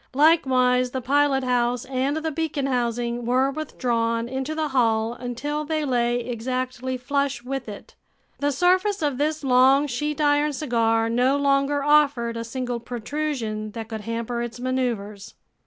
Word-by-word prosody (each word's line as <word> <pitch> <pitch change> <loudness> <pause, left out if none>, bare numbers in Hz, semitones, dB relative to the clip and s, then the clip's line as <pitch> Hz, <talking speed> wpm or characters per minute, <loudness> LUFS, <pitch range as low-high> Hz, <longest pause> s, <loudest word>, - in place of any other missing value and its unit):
Likewise 255 -5 +4
the 260 - -3
pilothouse 255 -2 +1
and 265 +3 -1
the 315 0 -2
beacon 300 -2 -2
housing 240 -2 -1
were 255 +3 +2
withdrawn 235 -6 -1
into 265 +4 -3
the 310 -1 -1
hull 230 -3 +1
until 255 +5 -4
they 310 0 -1
lay 240 -2 +1
exactly 255 +2 -3
flush 275 0 -1
with 260 -2 -4
it. 205 - -10 0.5
The 285 0 +1
surface 370 +5 +2
of 285 -3 -1
this 305 +1 -1
long 265 +2 +5
sheet 295 +3 -3
iron 295 0 +2
cigar 230 -5 +1
no 250 +4 +2
longer 280 0 +1
offered 285 -6 +3
a 230 - -3
single 245 0 -4
protrusion 235 -3 -4
that 225 -1 -6
could 220 -2 -5
hamper 230 +2 -3
its 240 0 -5
maneuvers. 235 -6 -3
255 Hz, 145 wpm, -24 LUFS, 235-285 Hz, 0.5 s, long